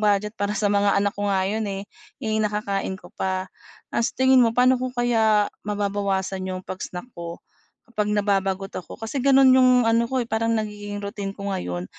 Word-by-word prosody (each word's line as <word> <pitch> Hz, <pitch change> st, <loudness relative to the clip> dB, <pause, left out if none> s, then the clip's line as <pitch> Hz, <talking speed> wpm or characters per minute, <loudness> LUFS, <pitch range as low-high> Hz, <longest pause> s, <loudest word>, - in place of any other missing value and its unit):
budget 210 Hz, 0 st, +2 dB
para 205 Hz, +1 st, -1 dB
sa 205 Hz, -1 st, +1 dB
mga 200 Hz, 0 st, +3 dB
anak 200 Hz, 0 st, +2 dB
ko 205 Hz, -, -1 dB
nga 190 Hz, -1 st, +1 dB
'yon, 220 Hz, 0 st, -1 dB
eh, 195 Hz, 0 st, -4 dB, 0.4 s
eh 220 Hz, -1 st, 0 dB
nakakain 205 Hz, -2 st, -1 dB
ko -, -, -15 dB
pa. 185 Hz, 0 st, -2 dB, 0.4 s
Ah, -, -, +1 dB
sa -, -, -1 dB
tingin 260 Hz, 0 st, +5 dB
mo 230 Hz, -1 st, +2 dB
paano 255 Hz, 0 st, +5 dB
ko 255 Hz, 0 st, -2 dB
kaya 220 Hz, -4 st, +2 dB, 0.2 s
mababawasan 200 Hz, -2 st, -1 dB
yung 185 Hz, 0 st, -4 dB
pag-snack 185 Hz, +2 st, -6 dB
ko 170 Hz, 0 st, -7 dB, 0.5 s
kapag 210 Hz, -1 st, 0 dB
nababagot 195 Hz, -1 st, 0 dB
ako? -, -, -11 dB
Kasi 225 Hz, +4 st, -3 dB
gano'n 270 Hz, 0 st, +6 dB
yung 255 Hz, -1 st, +6 dB
ano 230 Hz, +1 st, +3 dB
ko, 260 Hz, -1 st, 0 dB
eh, -, -, -7 dB
parang 225 Hz, +1 st, +1 dB
nagiging 205 Hz, -1 st, -4 dB
routine 200 Hz, -1 st, -5 dB
ko 200 Hz, 0 st, -4 dB
ngayon, 90 Hz, -, -3 dB
205 Hz, 190 wpm, -24 LUFS, 195-225 Hz, 0.5 s, gano'n